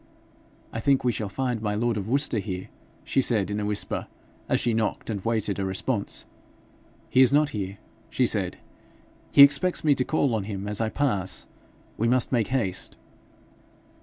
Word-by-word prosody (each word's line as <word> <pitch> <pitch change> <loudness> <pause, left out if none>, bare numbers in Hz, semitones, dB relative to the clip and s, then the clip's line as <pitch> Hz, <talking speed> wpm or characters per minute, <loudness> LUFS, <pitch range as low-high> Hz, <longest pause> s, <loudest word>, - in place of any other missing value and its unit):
'I 115 - -3
think 135 +3 +2
we 125 - +2
shall 105 -2 -3
find 125 +1 -2
my 105 -1 -1
lord 120 +2 0
of 100 -1 -4
Worcester 135 -2 +1
here,' 95 -3 -5 0.3
she 135 - +1
said 105 -6 +1
in 105 - -2
a 105 - -2
whisper, 105 0 -2 0.4
as - - +2
she 120 - +1
knocked 110 0 -1
and 100 -3 -4
waited 110 -4 0
a - - -1
response. 100 +4 -2 0.9
'He 130 - +5
is 130 - +6
not 145 +1 +3
here,' 100 -5 -5 0.3
she - - +1
said. - - 0 0.7
'He 140 - +9
expects 145 +6 +4
me 150 -2 +5
to 130 - 0
call 140 -3 +1
on 105 -3 -1
him 100 -1 -5
as 105 +1 -1
I 110 - 0
pass. 100 -9 -1 0.5
We 115 - +2
must 125 +1 +2
make 115 -5 +1
haste.' 105 -9 -2
110 Hz, 180 wpm, -26 LUFS, 100-130 Hz, 0.9 s, He